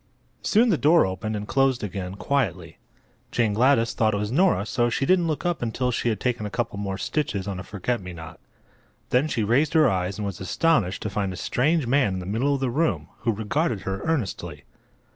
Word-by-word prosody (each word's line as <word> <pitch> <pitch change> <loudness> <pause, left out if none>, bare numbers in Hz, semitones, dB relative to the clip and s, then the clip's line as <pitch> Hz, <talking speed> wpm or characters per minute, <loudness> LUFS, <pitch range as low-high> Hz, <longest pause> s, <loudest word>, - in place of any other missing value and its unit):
Soon 230 +3 +3
the 175 - +2
door 160 +3 +5
opened 95 +4 -3
and 105 0 -5
closed 135 -3 +2
again, 95 -2 -4
quietly. 95 -8 -2 0.5
Jane 115 -3 +1
Gladys 115 0 +3
thought 110 -2 +1
it - - 0
was 105 +1 -2
Nora, 125 - +3
so 120 +3 +1
she 135 - 0
didn't 180 +1 +3
look 155 0 -2
up 175 -2 0
until 125 +2 -1
she 120 - 0
had 110 -3 -1
taken 120 -3 -1
a 105 - -3
couple 115 -2 -3
more 100 -1 -3
stitches 120 - -2
on 95 -2 -4
a - - -6
forget 110 +4 -3
me 90 -1 -7
not. 80 -2 -10 0.7
Then 130 +5 +3
she 120 -7 -1
raised 130 +8 +2
her 155 -2 +6
eyes 95 -2 -1
and 105 - -3
was 100 -3 -5
astonished 100 - +1
to 105 - -3
find 100 -1 -1
a - - -6
strange 150 - +1
man 120 -6 +2
in - - -3
the 90 - -7
middle 120 +9 0
of 135 - -4
the 130 -2 0
room, 160 +5 0
who 115 - 0
regarded 110 - -1
her 95 0 -4
earnestly. 150 - -3
115 Hz, 220 wpm, -24 LUFS, 100-140 Hz, 0.7 s, her